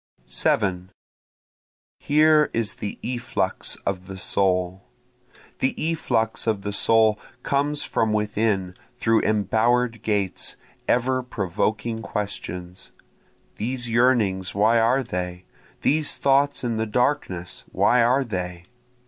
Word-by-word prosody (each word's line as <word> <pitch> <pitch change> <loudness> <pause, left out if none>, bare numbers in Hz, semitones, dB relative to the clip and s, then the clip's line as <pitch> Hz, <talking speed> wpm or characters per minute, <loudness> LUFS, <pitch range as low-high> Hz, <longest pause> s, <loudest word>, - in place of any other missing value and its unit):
7 90 - 0 1.1
Here 150 0 +4
is 115 -2 -1
the 105 - -5
efflux 120 -1 -2
of 95 -2 -3
the 95 -1 -7
soul, 95 0 0 0.7
The 130 - +1
efflux 115 -10 -1
of 105 -3 0
the 105 0 -3
soul 110 0 +3 0.2
comes 145 +1 0
from 110 -1 0
within 105 -3 0 0.2
through 115 -2 +2
embower'd 115 +3 +1
gates, 100 -4 -1 0.3
ever 130 +1 +2
provoking 110 0 -2
questions, 90 -4 -5 0.7
These 120 +2 -2
yearnings 115 -7 +2
why 110 +3 +4
are 125 +4 +3
they? 90 -4 -5 0.4
these 150 0 +1
thoughts 140 +1 +2
in 115 -2 -1
the 110 0 -1
darkness 105 -7 -1
why 125 0 +3
are 125 +4 +3
they? 90 -6 -5
110 Hz, 110 wpm, -24 LUFS, 95-125 Hz, 1.1 s, Here